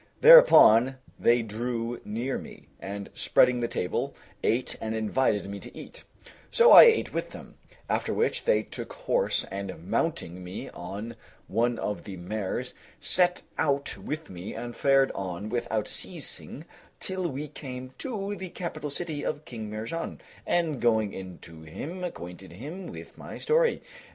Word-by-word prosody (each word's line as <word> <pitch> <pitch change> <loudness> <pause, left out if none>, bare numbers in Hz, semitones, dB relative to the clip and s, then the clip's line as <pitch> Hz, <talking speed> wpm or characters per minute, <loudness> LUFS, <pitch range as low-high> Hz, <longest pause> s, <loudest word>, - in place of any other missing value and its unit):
Thereupon 135 - +9 0.2
they 120 0 +4
drew 115 +2 -3
near 120 +5 -3
me, - - -12
and 100 +2 -6
spreading 125 -1 +3
the 120 - 0
table, 90 - -2 0.3
ate 125 +3 +1
and 110 0 -2
invited 110 -1 +1
me 100 +1 -6
to - - -11
eat; - - -11 0.4
so 475 0 +6
I - - +12
ate 460 -1 +3
with - - -3
them, - - -11 0.3
after - - 0
which 465 - 0
they - - +3
took - - -8
horse, - - 0
and 95 -3 -6
mounting 90 +2 -1
me 90 +2 -7
on 100 +6 -7 0.3
one 120 +3 +1
of 105 - -3
the 95 -2 -7
mares, 105 +6 -3 0.3
set 180 0 +2 0.2
out 140 -1 0
with 155 +2 -5
me 90 +1 -7
and 120 +1 -6
fared 135 -1 +4
on 95 +2 -5
without 110 -2 -1
ceasing, - - -5 0.3
till 185 -1 -2
we 145 +2 -5
came 130 -3 -8
to 205 -5 -3
the 190 -1 -7
capital 155 -4 -5
city 150 0 -3
of 150 - -3
King 110 -3 -7
Mihrján, 115 +11 -5 0.3
and 165 -6 +1
going 110 -4 +2
in 95 -2 -8
to 80 -1 -11
him 155 - -7
acquainted 90 - -7
him 155 - -7
with - - -10
my - - -8
story. 475 +1 +2
120 Hz, 155 wpm, -27 LUFS, 105-160 Hz, 0.4 s, I